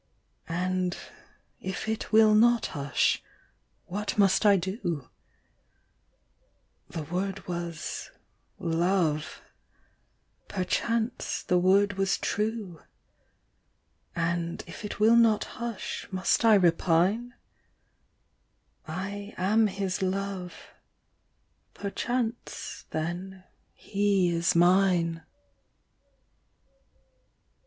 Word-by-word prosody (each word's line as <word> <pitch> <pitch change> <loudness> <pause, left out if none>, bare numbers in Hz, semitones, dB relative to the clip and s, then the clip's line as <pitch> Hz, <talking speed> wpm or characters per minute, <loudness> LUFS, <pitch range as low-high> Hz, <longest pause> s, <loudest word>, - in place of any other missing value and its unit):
And, 180 +1 -1 0.6
if 190 +3 -5
it 220 -1 -3
will 215 -1 +6
not 235 +2 +5
hush, 140 -1 +1 0.6
what 205 +4 -3
must 200 +1 +4
I 200 -1 +6
do? 175 - -4 1.8
The 160 - -5
word 190 +5 -3
was 170 -2 -5 0.5
"Love"; 165 -2 0 1.0
perchance 225 +5 -1
the 180 - +2
word 195 +2 +3
was 195 0 +2
true: 210 -5 -3 1.3
And, 170 0 -1
if - - -10
it 210 - -6
will 220 +2 +6
not 230 -2 +4
hush, 235 -3 -5
must 185 +4 +1
I 225 -2 +7
repine? 185 +6 +2 1.5
I 200 +5 -5
am 215 +4 +3
his 195 -1 -3
love; 190 -1 -3 1.0
perchance 235 +3 -3
then 180 +4 -4 0.3
he 200 -3 +1
is 170 0 +1
mine. 175 -2 +3
190 Hz, 80 wpm, -28 LUFS, 175-210 Hz, 1.8 s, I